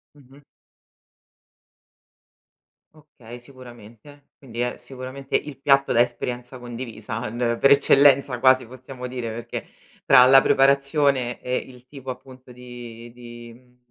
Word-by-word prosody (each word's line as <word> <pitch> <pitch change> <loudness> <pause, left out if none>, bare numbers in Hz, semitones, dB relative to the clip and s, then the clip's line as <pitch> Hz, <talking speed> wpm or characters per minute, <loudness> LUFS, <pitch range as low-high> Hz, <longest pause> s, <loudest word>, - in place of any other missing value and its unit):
Mh-mh. 140 0 -19 2.5
Okay, 125 -6 -14
sicuramente. 125 +2 -16
Quindi 120 -4 -11
è, 125 0 -2
sicuramente, 135 +1 -8
il 145 -3 -3
piatto 140 -1 +3
da 120 - +4
esperienza 125 +1 -4
condivisa 120 -1 -7
n 120 +1 -2
per 140 - +4
eccellenza, 140 -2 +4
quasi, 130 0 +4
possiamo 130 +1 -10
dire, 125 -2 -5
perché 115 +1 -7 0.4
tra 125 - +7
la 135 +1 +7
preparazione 140 -2 +1
e 125 0 -2
il 125 -1 -10
tipo, 135 -1 -11
appunto, 130 0 -11
di 120 -1 -11
di 120 -1 -12
mhmm, 125 +1 -23
125 Hz, 120 wpm, -22 LUFS, 120-135 Hz, 2.5 s, tra